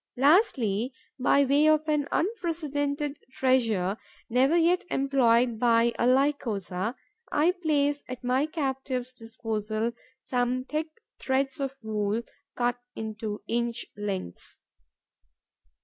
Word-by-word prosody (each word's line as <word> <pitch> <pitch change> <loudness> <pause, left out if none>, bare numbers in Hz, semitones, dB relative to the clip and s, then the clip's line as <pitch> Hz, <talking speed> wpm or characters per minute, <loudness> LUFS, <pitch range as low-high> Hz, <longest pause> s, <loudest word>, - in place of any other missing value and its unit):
Lastly, 260 - +3 0.3
by 280 +2 +4
way 285 +3 +4
of 310 0 +3
an 300 -2 +1
unprecedented 295 -7 -1
treasure, 225 -8 +2 0.3
never 265 +7 +4
yet 345 +2 +3
employed 250 -5 +2
by 235 0 +4
a 240 - +3
Lycosa, 235 -7 0 0.4
I 310 +4 +3
place 290 -5 0
at 255 0 -7
my 255 +4 +1
captives' 265 -5 -3
disposal 225 -1 -3 0.3
some 250 0 -1
thick 305 +3 -2 0.3
threads 270 +3 0
of 275 -1 -2
wool, 215 +1 -1 0.3
cut 245 0 0 0.2
into 215 -1 -5
inch 235 0 -1
lengths. 195 - -5
255 Hz, 105 wpm, -27 LUFS, 230-290 Hz, 0.4 s, by